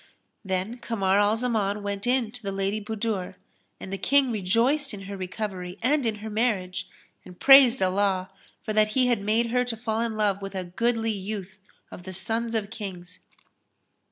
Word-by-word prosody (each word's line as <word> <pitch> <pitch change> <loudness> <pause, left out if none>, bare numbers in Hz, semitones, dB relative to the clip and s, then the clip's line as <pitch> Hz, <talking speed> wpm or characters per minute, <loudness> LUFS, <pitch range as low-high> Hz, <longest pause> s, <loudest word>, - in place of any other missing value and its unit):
Then 190 +5 -2
Kamar 200 -4 +1
al 205 +1 +3
Zaman 215 -4 -1
went 200 +2 -3
in 245 -3 +1
to 245 +1 -10
the 200 -3 -4
Lady 195 +2 -2
Budur 210 -4 -3 0.4
and 190 - -7
the 195 - -3
King 275 -2 +3
rejoiced 230 +7 +1
in 195 - -9
her 195 +1 -7
recovery 185 -1 -5
and 280 0 +2
in 220 - 0
her - - -4
marriage; 210 -5 -1 0.3
and 180 -1 -14
praised 270 -2 +8
Allah 190 0 +1 0.3
for 215 - -3
that 215 0 +3
He 260 -1 +4
had 240 -4 +1
made 225 +3 +1
her 250 0 +2
to 240 -2 -4
fall 220 0 -2
in 230 -2 -2
love 200 -2 +1
with 195 0 -6
a 185 - -2
goodly 225 +5 0
youth 200 -1 -6 0.3
of - - -9
the 185 +1 -8
sons 225 +5 -2
of 215 -1 -2
Kings. 190 -6 -8
210 Hz, 185 wpm, -26 LUFS, 195-230 Hz, 0.4 s, praised